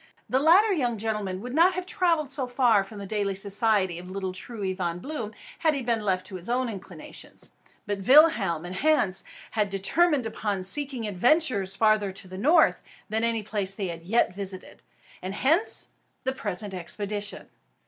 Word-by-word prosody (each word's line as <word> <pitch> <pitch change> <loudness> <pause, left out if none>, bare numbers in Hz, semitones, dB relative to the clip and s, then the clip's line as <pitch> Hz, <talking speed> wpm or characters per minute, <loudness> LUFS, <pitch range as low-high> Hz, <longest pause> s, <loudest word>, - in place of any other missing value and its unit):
The 260 - +1
latter 370 +8 +5
young 245 -9 -1
gentleman 205 -3 -3
would 250 +2 -7
not 340 +5 +4
have 365 0 -3
travelled 335 -6 0
far 250 -5 +2
from 205 +2 -12
the 200 - -7
daily 200 -1 -2
society 200 -2 +1
of 180 +1 -10
little 190 0 -4
Truey 195 0 -4
Von 175 -2 -2
Bloom, 230 0 -5 0.3
had 315 -3 +2
he 270 - -3
been 235 -2 0
left 185 -3 -1
to 190 - -7
his 180 +5 -7
own 250 0 0
inclinations. 200 -4 -9 0.3
But 205 -2 -3
Willem 235 - +5
and 180 +1 -6
Hans 255 -9 +2 0.3
had 210 -2 0
determined 265 - +2
upon 205 -3 -3
seeking 265 +3 +2
adventures 210 - +2
farther 215 -1 +2
to 190 - -6
the 185 +1 -8
north 315 - +4 0.3
than 220 +2 -1
any 230 -2 0
place 200 -2 -1
they 195 -3 -3
had 165 -1 -7
yet 195 +3 +1
visited; 190 -1 -7 0.4
and 185 +2 -5
hence 320 - +3 0.3
the 260 - -1
present 205 -5 -3
expedition. 205 +3 -4
210 Hz, 170 wpm, -26 LUFS, 190-260 Hz, 0.4 s, latter